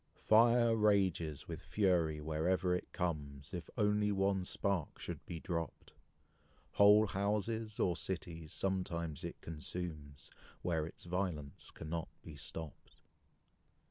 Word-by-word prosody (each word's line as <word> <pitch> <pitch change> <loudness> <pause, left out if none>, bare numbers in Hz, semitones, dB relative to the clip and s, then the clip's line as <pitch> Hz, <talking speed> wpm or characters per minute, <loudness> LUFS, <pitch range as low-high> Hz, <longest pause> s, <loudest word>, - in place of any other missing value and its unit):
Fire 115 +1 +5
rages 95 -8 +2
with - - -5
fury 85 -7 +2
wherever 85 +4 +1
it 90 - -3
comes, 70 -4 -3
If 90 -1 -5
only 105 -1 +3
one 95 -1 +1
spark 95 -3 -1
should - - -6
be 85 - -5
dropped; 85 -1 -4 0.8
Whole 105 +1 +7
houses, 105 +2 -1
or 90 - +2
cities, 85 -4 -5
sometimes 85 -5 -2
it - - -5
consumes, 75 -2 -6 0.3
Where 80 -3 0
its - - -12
violence 85 -6 -3
cannot 80 +1 -4 0.2
be 80 - -9
stopped. 75 +1 -8
90 Hz, 115 wpm, -36 LUFS, 80-100 Hz, 0.8 s, Whole